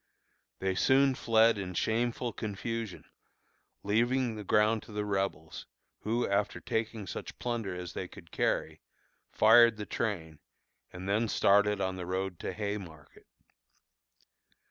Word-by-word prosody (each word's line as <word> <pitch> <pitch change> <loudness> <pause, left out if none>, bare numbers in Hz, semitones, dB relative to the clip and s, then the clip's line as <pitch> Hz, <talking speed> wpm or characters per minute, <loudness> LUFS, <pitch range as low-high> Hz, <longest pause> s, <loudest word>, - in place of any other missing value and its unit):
They 95 0 -1
soon 135 +7 +4
fled 115 -3 +3
in 90 -2 -5
shameful 120 +3 0
confusion, 110 0 -5 0.8
leaving 120 +4 +1
the 105 -1 -7
ground 105 +2 +3
to - - -14
the 105 0 -3
Rebels, 95 -5 -3 0.3
who, 115 +3 -1
after 100 +1 0
taking 110 -2 -3
such - - -7
plunder 115 -6 -3
as 90 -1 -6
they - - -4
could - - -14
carry, - - -1 0.5
fired 115 0 +6
the 105 - -5
train, 80 -11 -3 0.5
and 90 +1 -8
then 105 +4 +1
started 105 0 +3
on 95 -1 -2
the 90 -1 -6
road 95 -1 -3
to - - -4
Haymarket. 100 -8 -7
105 Hz, 130 wpm, -30 LUFS, 95-115 Hz, 0.8 s, fired